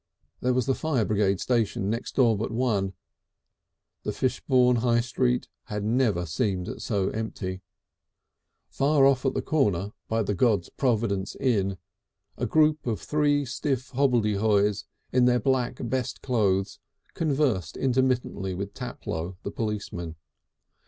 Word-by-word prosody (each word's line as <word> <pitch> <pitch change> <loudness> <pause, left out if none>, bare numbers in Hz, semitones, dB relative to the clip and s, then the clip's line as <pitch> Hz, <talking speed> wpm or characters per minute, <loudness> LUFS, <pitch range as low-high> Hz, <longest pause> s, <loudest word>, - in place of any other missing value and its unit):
There 125 0 +1
was 125 -2 +1
the 135 - +2
fire 135 -7 0
brigade 100 -3 +1
station 115 -5 0
next 115 +3 -3
door 120 -4 +4
but 105 - -2
one. 110 -5 0 1.1
The - - -3
Fishbourne 125 -1 +2
High 120 0 +2
Street 125 +1 0 0.2
had 105 -1 -4
never 110 -5 +1
seemed 90 - -2
so 100 -4 0
empty. 95 -4 -4 1.1
Far 140 0 +3
off 135 -1 +3
at - - 0
the - - -1
corner 105 - +1 0.2
by 115 0 0
the 105 - -1
God's 100 -3 +2
Providence 110 -6 0
Inn 100 -8 0 0.6
a - - -2
group 155 -2 +3
of 110 -3 -1
three 145 -1 +1
stiff 130 0 -2
hobbledehoys 105 -6 +2 0.3
in 125 -1 +4
their 125 0 +4
black, 130 0 0
best 125 +1 -2
clothes, 100 -6 +1 0.3
conversed 135 - 0
intermittently 125 -7 0
with 100 +2 -5
Taplow, 90 -8 -5
the 100 - -4
policeman. 100 -7 -4
115 Hz, 130 wpm, -26 LUFS, 100-130 Hz, 1.1 s, door